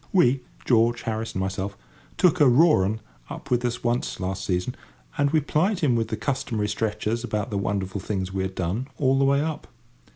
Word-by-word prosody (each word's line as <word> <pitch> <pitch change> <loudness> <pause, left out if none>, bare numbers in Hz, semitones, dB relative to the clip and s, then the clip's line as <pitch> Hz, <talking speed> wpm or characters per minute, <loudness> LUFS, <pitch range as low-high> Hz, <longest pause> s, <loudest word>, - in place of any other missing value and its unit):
We—George, 120 -6 +2
Harris, 110 0 -3
and 95 - -2
myself—took 95 - -1
a 140 - +7
"raw 150 - +5
'un" 110 +3 -2 0.3
up 140 - -9
with 120 0 +2
us 120 0 -2
once 120 0 -1
last 95 0 -3
season, 90 +6 -1 0.4
and 145 0 +2
we 155 +1 +3
plied 180 +7 +1
him 135 -6 +3
with 115 -1 0
the - - -3
customary 115 -6 -1
stretchers 110 +2 -1
about 105 -2 -2
the 100 - -1
wonderful 100 -1 -2
things 95 -2 -3
we 95 - -1
had 95 0 -3
done 95 +9 -2
all 135 -1 +2
the 135 - +4
way 140 +1 +3
up. 155 0 -3
115 Hz, 190 wpm, -25 LUFS, 100-135 Hz, 0.4 s, a